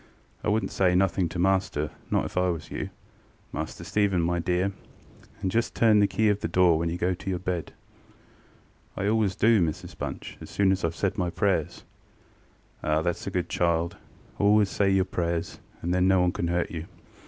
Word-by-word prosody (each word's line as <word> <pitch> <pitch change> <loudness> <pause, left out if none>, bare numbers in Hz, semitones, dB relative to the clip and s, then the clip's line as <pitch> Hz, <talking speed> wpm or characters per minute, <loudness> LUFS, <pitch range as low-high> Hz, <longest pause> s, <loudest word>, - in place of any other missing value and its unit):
I - - -2
wouldnŌĆÖt 110 +1 +1
say 90 -2 +2
nothing 95 -1 +2
to 85 - -6
master, 90 -5 +1 0.2
not - - +1
if - - -7
I 90 0 +2
was 85 -3 -4
you, - - -4 0.6
Master - - -5
Stephen, 100 -3 +1
my 85 +1 0
dear; 90 +3 0 0.7
and 95 - 0
just 115 +4 0
turn 110 -2 +5
the 100 - +5
key 110 +2 +1
of 105 0 +1
the - - -2
door 85 -1 +4
when 85 0 0
you 85 - -3
go 90 +1 +1
to 90 - -6
your 90 - 0
bed. 90 -2 -3 1.2
ŌĆØ - - -2
ŌĆ£I 100 - +2
always 105 -4 +1
do, 110 0 +4
Mrs 85 +2 -3
Bunch, - - -6
as - - -9
soon 100 -1 +2
as 95 0 0
IŌĆÖve 80 - 0
said 100 +2 -1
my 90 -1 +1
prayers. 90 -4 -1 1.0
ŌĆØ - - -2
ŌĆ£Ah, 75 +1 +2
thatŌĆÖs 85 +2 -2
a - - +1
good 90 -2 -2
child: 85 0 0 0.4
always 105 0 +4
say 100 -1 +1
your 95 -1 +3
prayers, 85 -2 -2 0.2
and 90 +1 0
then 90 0 +3
no 95 -1 +4
one 90 0 +3
canŌĆÖt 85 -1 -2
hurt 85 0 0
you. 85 0 -5
90 Hz, 205 wpm, -27 LUFS, 85-100 Hz, 1.2 s, turn